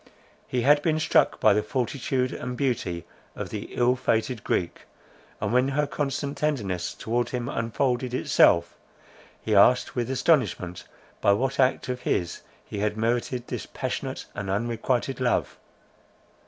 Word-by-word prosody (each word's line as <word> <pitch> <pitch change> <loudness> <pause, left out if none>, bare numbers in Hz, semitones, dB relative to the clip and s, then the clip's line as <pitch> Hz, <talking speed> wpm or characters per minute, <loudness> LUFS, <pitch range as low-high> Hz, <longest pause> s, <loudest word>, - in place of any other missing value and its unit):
He 125 -2 -1
had 145 +3 +5
been 155 -1 +1
struck - - +3
by 110 - +5
the 105 - +2
fortitude 130 +3 -1
and 125 0 -5
beauty 95 -11 -1 0.3
of - - -5
the - - -5
ill 125 +1 +3
fated 125 -2 -1
Greek; 85 - -2 0.5
and, 105 +2 -2
when 125 +1 +4
her 145 +2 +1
constant 140 0 -3
tenderness 100 - -1
towards 120 +1 -1
him 125 -1 -3
unfolded 125 +1 -1
itself, 85 -8 +3 0.7
he 110 - -1
asked 120 +6 +5
with 120 -1 -1
astonishment, 125 - +1 0.4
by 100 - +5
what 130 +6 -1
act 130 -1 +2
of 125 0 -3
his 85 -7 -1 0.2
he 105 - -6
had 105 +1 -1
merited 120 +2 -1
this - - -5
passionate - - -4
and 100 -1 -5
unrequited 120 +5 -1
love. 125 -2 0
125 Hz, 145 wpm, -26 LUFS, 105-130 Hz, 0.7 s, had